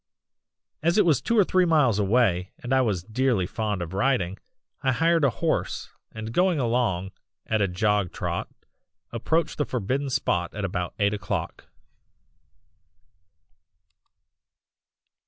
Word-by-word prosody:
"As 170 +5 +2
it 210 - +5
was 155 -7 +3
two 230 - 0
or 205 - +7
three 185 0 +2
miles 150 - +3
away, 100 -4 +2
and 125 +2 -3
I 130 - +4
was 100 -8 0
dearly 115 -2 0
fond 105 -1 -2
of 85 +1 -8
riding, 100 -4 0 0.4
I 130 - +2
hired 165 +3 +2
a 140 - +5
horse 115 - -2 0.2
and 110 0 -7
going 180 +2 +3
along 115 -7 0 0.3
at 110 -1 0
a 100 - +3
jog 100 0 0
trot - - -3 0.6
approached 160 +10 -1
the - - +3
forbidden 130 +4 -2
spot 90 -9 -1
at 105 -2 -2
about 90 -1 -3
eight 100 0 +2
o'clock. 100 -4 -4
115 Hz, 135 wpm, -25 LUFS, 95-135 Hz, 0.6 s, or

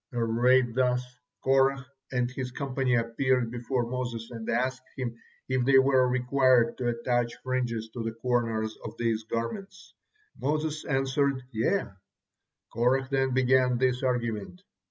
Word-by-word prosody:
Arrayed 120 +1 +3
thus, 125 0 +1 0.4
Korah 135 0 +3 0.3
and 125 -1 0
his 130 -1 -4
company 130 -1 -1
appeared 120 +1 +1
before 120 +1 -2
Moses 120 -2 -4
and 115 -2 -6
asked 130 +2 0 0.2
him 120 -3 -3 0.3
if 130 -1 +1
they 135 +2 +5
were 130 -1 +5
required 125 -1 +3
to 125 - -1
attach 120 0 0
fringes 120 -3 -2
to 120 +1 -6
the 115 - -2
corners 115 -2 -1
of 110 +1 -7
these 115 -2 0
garments. 190 - -5 0.5
Moses 155 +1 -1
answered, 135 -1 0
"Yea." 115 - 0 0.9
Korah 130 +3 +1
then 135 -1 +1
began 130 -1 +3
this 125 0 +1
argument. 120 - -2
125 Hz, 135 wpm, -28 LUFS, 120-130 Hz, 0.9 s, they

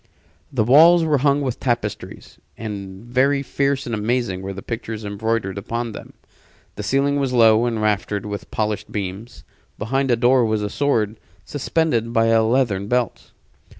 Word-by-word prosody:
The 125 -6 +1
walls 165 +8 +6
were 150 -3 +2
hung 140 +1 +2
with 130 -4 -3
tapestries, 105 -6 -4 0.2
and 100 -2 -7
very 135 +3 +1
fierce 140 0 -1
and 120 - -4
amazing 110 -3 -1
were 95 +1 -5
the 95 0 -8
pictures 110 -2 -5
embroidered 100 -1 -2
upon 115 +3 -4
them. - - -10 0.6
The - - -5
ceiling 140 +1 +1
was 135 -2 -1
low 115 -1 +5
and 115 -2 -2
raftered 105 -1 -1
with 105 -1 -6
polished 105 -1 -3
beams. 100 +3 -6 0.3
Behind 135 +5 -1
the 120 - +4
door 125 +1 +4
was 110 -2 0
a 105 - -3
sword 115 -7 0 0.3
suspended 140 -5 -1
by 115 0 +3
a 115 0 +4
leathern 110 -4 +1
belt. 125 -2 -1
115 Hz, 160 wpm, -21 LUFS, 105-130 Hz, 0.6 s, walls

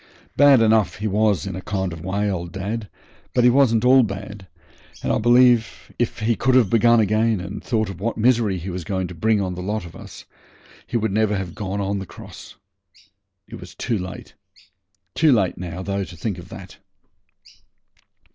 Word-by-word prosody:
Bad 140 -3 +6
enough 110 -1 +2
he 105 - -3
was 105 -2 +1
in 95 -2 -5
a 95 - -6
kind 95 -3 -3
of 80 -1 -9
way, 100 +3 -1
old 85 -3 -3
dad, 100 +4 -5 0.5
but 125 - +3
he 125 - +6
wasn't 125 -3 +3
all 130 +1 +7
bad, 100 -2 -5 0.6
and - - 0
I - - +1
believe 120 0 +3
if 120 -2 -2
he 115 +2 +1
could 130 +3 +1
have 120 -7 +4
begun 115 +1 +4
again 110 0 +1
and 95 +3 -7
thought 110 -3 0
of 95 -3 -8
what 115 +2 -2
misery 115 -4 +2
he 90 +2 -6
was 90 0 -5
going 95 +2 -2
to - - -8
bring 110 +5 +1
on 95 -2 -2
the 90 - -6
lot 105 +1 -3
of 85 - -12
us - - -11 0.6
he - - -1
would 110 -2 -1
never 105 0 +1
have 90 -3 -5
gone 100 -1 -4
on 100 0 -2
the 95 - -7
cross. - - -12 0.9
It - - -10
was - - -12
too 115 -4 -2
late, 90 +1 -8 0.8
too 160 -2 +3
late 100 -9 +1
now, 90 +1 -6
though, 100 0 -2
to 90 - -11
think 95 +1 -4
of 90 +1 -12
that. 95 -1 -11
105 Hz, 195 wpm, -22 LUFS, 95-115 Hz, 0.9 s, all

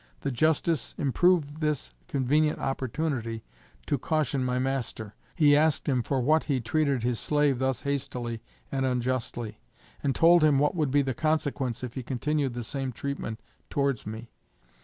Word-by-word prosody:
The 140 - -1
Justice 155 +1 +1
improved 155 +1 +2
this 150 - -1
convenient 150 +4 +2
opportunity 130 -4 -2 0.4
to 145 - 0
caution 145 -2 0
my 125 0 0
master. 125 -5 -2 0.2
He 145 -3 +5
asked 155 +1 +2
him 130 -4 +2
for 135 +3 -1
what 155 +5 +3
he 140 -4 +1
treated 135 +1 0
his 120 -1 0
slave 145 -4 +2
thus 130 -2 0
hastily 125 -5 -3 0.3
and 135 - 0
unjustly, 125 -3 -2 0.4
and 135 -2 0
told 170 0 +6
him 150 -3 +5
what 145 +2 +2
would 155 -5 0
be 140 +2 +3
the 130 -1 -1
consequence 140 -4 -1
if 125 -2 -5
he 130 - -4
continued 135 +1 -1
the 120 - -3
same 135 +3 -3
treatment 125 -3 -5 0.3
towards 140 -5 0
me. 110 +2 -7
135 Hz, 160 wpm, -28 LUFS, 125-150 Hz, 0.4 s, told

